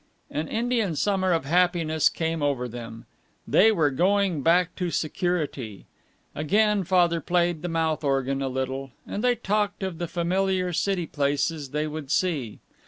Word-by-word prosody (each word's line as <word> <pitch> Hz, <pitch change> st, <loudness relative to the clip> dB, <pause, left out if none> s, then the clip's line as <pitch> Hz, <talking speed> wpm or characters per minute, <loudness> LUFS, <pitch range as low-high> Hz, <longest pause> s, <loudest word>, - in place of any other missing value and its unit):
An 155 Hz, +2 st, -2 dB
Indian 230 Hz, -6 st, 0 dB
summer 190 Hz, +2 st, +1 dB
of 165 Hz, -4 st, +1 dB
happiness 165 Hz, -1 st, +2 dB
came 165 Hz, -1 st, -2 dB
over 140 Hz, -4 st, 0 dB
them. 115 Hz, -1 st, -9 dB, 0.4 s
They 220 Hz, +3 st, +5 dB
were 155 Hz, -8 st, +2 dB
going 185 Hz, +2 st, +1 dB
back 175 Hz, +3 st, +3 dB
to 180 Hz, -1 st, -1 dB
security. 150 Hz, -, -2 dB, 0.5 s
Again 205 Hz, +6 st, +2 dB
Father 175 Hz, -2 st, +3 dB
played 175 Hz, -1 st, +1 dB
the 175 Hz, -, -3 dB
mouth 160 Hz, -1 st, 0 dB
organ 135 Hz, -1 st, 0 dB
a 135 Hz, -, -1 dB
little, 130 Hz, 0 st, -4 dB
and 205 Hz, -, -4 dB
they 250 Hz, -1 st, +3 dB
talked 210 Hz, -2 st, -1 dB
of 185 Hz, -3 st, -4 dB
the 175 Hz, -, -2 dB
familiar 185 Hz, +1 st, 0 dB
city 185 Hz, 0 st, 0 dB
places 145 Hz, 0 st, -1 dB
they 150 Hz, +3 st, -1 dB
would 155 Hz, -2 st, -6 dB
see. 155 Hz, -, 0 dB
165 Hz, 155 wpm, -25 LUFS, 145-185 Hz, 0.5 s, They